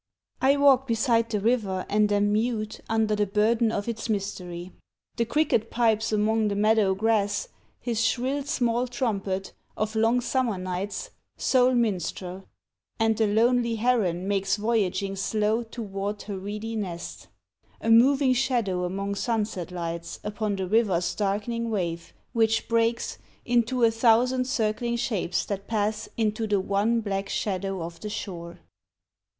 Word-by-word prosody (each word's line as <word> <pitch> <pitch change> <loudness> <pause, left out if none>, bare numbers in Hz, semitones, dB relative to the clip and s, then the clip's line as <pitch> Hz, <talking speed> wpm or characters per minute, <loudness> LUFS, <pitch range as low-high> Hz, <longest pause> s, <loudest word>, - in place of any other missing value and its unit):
I 275 +2 +4
walk 270 -2 +5
beside 230 0 +2
the 215 -2 0
river, 200 -4 0
and 210 0 +2
am 205 0 +2
mute 215 -1 -1
Under 220 -1 +2
the 210 0 +1
burden 220 +3 +2
of 205 -1 -3
its 230 -1 -4
mystery. 185 -4 -4 0.5
The 235 - +1
cricket 235 -4 +1
pipes 225 -2 +1
among 215 +1 +2
the 200 - -1
meadow 210 -2 +3
grass 205 -1 +1 0.3
His 230 -2 -1
shrill 260 +5 0
small 250 -4 0
trumpet, 200 -6 -2 0.2
of 215 +1 -2
long 225 +3 +3
summer 245 -4 0
nights 185 +2 -4 0.3
Sole 255 -1 +3
minstrel: 190 -4 -2 0.5
and 225 0 +3
the 220 0 +2
lonely 235 +2 +2
heron 215 -6 +1
makes 195 0 +1
Voyaging 205 -3 0
slow 215 +3 +1
toward 205 -3 -5
her 205 - -5
reedy 210 +3 -5
nest 180 -5 -5 0.5
A 225 - 0
moving 260 +3 +5
shadow 235 -8 0
among 195 +2 -3
sunset 210 -5 -2
lights 170 -1 -5
Upon 210 0 -2
the 190 -1 -2
river's 180 -5 +2
darkening 215 +3 -1
wave, 170 -6 -3 0.2
which 225 -1 +2
breaks. 230 0 0 0.3
Into 240 +1 +1
a 230 - +6
thousand 245 +3 +3
circling 235 -1 -1
shapes 210 -7 -1
that 200 -1 -5
pass 215 -1 -1
Into 220 0 0
the 205 -2 +2
one 205 +4 +1
black 195 -2 -3
shadow 195 -2 -2
of 170 0 -8
the 210 - -5
shore. 175 -5 -6
215 Hz, 145 wpm, -26 LUFS, 195-230 Hz, 0.5 s, a